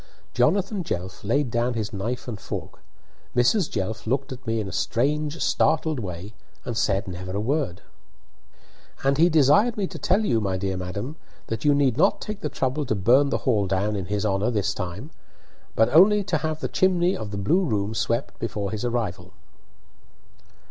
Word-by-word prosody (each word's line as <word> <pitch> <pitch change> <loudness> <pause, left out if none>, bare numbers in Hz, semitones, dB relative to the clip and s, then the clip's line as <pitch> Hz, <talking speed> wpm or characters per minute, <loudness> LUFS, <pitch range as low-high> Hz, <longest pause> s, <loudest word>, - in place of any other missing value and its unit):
Jonathan 190 - +1
Jelf 90 - -5
laid 120 +4 +1
down 120 +1 0
his 110 -2 -3
knife 115 +7 -3
and 110 -5 -5
fork. - - -6 0.6
Mrs. 150 - +3
Jelf 110 +2 -3
looked 135 +4 -1
at 130 -1 -9
me 115 0 0
in 105 - -3
a - - -6
strange, 145 - 0
startled 155 -2 +1
way, 95 0 -6 0.3
and 120 - -3
said 100 -3 +1
never 95 0 -6
a 100 - -1
word. 130 - -1 1.2
"And 135 +1 +2
he 170 +2 +6
desired 170 - +4
me 200 - 0
to - - -8
tell 210 +3 +2
you, 115 - +2
my 95 -2 -1
dear 95 0 -2
madam, 100 - -5 0.3
that 115 +6 -4
you 145 -1 +5
need 135 -4 +2
not 155 - +3
take 210 -1 -5
the - - -2
trouble 135 +3 -1
to 110 - 0
burn 125 +9 +4
the - - -2
hall 105 -7 +2
down 100 +3 0
in 95 -3 -4
his 105 +1 -1
honour 100 +2 +1
this 100 -3 0
time, 100 - -6 0.6
but 110 - +4
only 200 +5 +6
to - - 0
have 155 0 -3
the - - -1
chimney 185 0 +2
of 110 - -5
the 100 - -5
blue 160 - +2
room 105 - -1
swept 115 +3 -2
before 105 -4 -3
his 110 0 -4
arrival." 100 -7 -3
120 Hz, 185 wpm, -24 LUFS, 100-150 Hz, 1.2 s, he